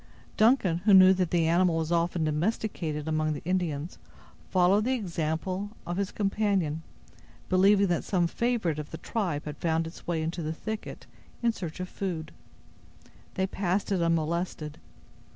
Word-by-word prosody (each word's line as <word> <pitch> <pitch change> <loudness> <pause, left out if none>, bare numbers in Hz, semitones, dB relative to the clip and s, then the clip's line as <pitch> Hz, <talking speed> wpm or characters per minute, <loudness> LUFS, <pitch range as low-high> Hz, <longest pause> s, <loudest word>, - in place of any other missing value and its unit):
Duncan, 215 -7 +3
who 205 -3 +7
knew 185 0 +8
that 185 -2 0
the 165 -2 +2
animal 170 0 +3
was 160 0 -2
often 170 0 +1
domesticated 155 -1 -1
among 155 0 0
the 145 - -7
Indians, 175 -3 -2 0.5
followed 185 +3 +4
the 260 +1 +2
example 185 -1 -2 0.2
of 175 +1 -3
his 200 -1 -1
companion, 195 -6 0 0.7
believing 195 +2 +5
that 175 -3 0
some 180 -3 +1
favorite 195 -4 0
of 150 - -6
the 160 - -7
tribe 175 -10 -2
had 150 -1 -6
found 165 -1 +1
its 165 - -10
way 165 -2 0
into 165 +2 -3
the 155 0 -2
thicket, 220 +6 -6 0.4
in 235 - +4
search 175 -6 -7
of 185 - -3
food. 170 -5 -4 1.0
They 190 - +1
passed 190 +1 -1
it 190 -3 +1
unmolested. 165 -1 -1
175 Hz, 155 wpm, -28 LUFS, 160-195 Hz, 1.0 s, knew